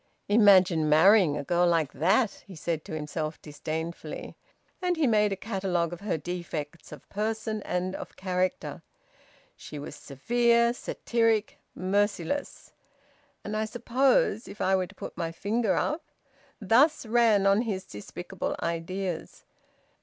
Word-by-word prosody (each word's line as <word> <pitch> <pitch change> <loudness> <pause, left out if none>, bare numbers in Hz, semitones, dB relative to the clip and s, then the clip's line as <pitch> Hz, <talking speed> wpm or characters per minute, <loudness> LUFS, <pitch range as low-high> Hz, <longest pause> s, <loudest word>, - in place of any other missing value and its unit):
"Imagine 185 -7 +5
marrying 165 0 +6
a 145 - -3
girl 175 +4 +2
like 165 -4 +1
that!" 195 - +1
he 190 - -10
said 160 0 -3
to 160 - -6
himself 155 +1 -4
disdainfully. 160 +3 -6 0.5
And 360 -1 0
he 320 - +2
made 210 -4 +3
a - - 0
catalogue 190 -5 -2
of 175 - -7
her 200 -5 -1
defects 170 -2 -6
of 150 -3 -11
person 215 +1 -2
and 180 0 -2
of - - -8
character. 185 -1 -2 0.7
She 150 - -9
was 145 - -7
severe, 235 - +2
satiric, 230 -3 0 0.2
merciless. 200 - -1 0.7
"And 210 - -4
I 215 0 0
suppose 240 -1 +1
if 200 - -10
I 190 +1 +2
were 185 -1 0
to 205 - -17
put - - -8
my 165 -1 -3
finger 215 +7 0
up!" 305 +3 0 0.6
Thus 250 - +3
ran 220 -3 +3
on 195 +2 +4
his 195 -5 -3
despicable 175 - -5
ideas. 170 +1 -4
190 Hz, 140 wpm, -28 LUFS, 170-220 Hz, 0.7 s, marrying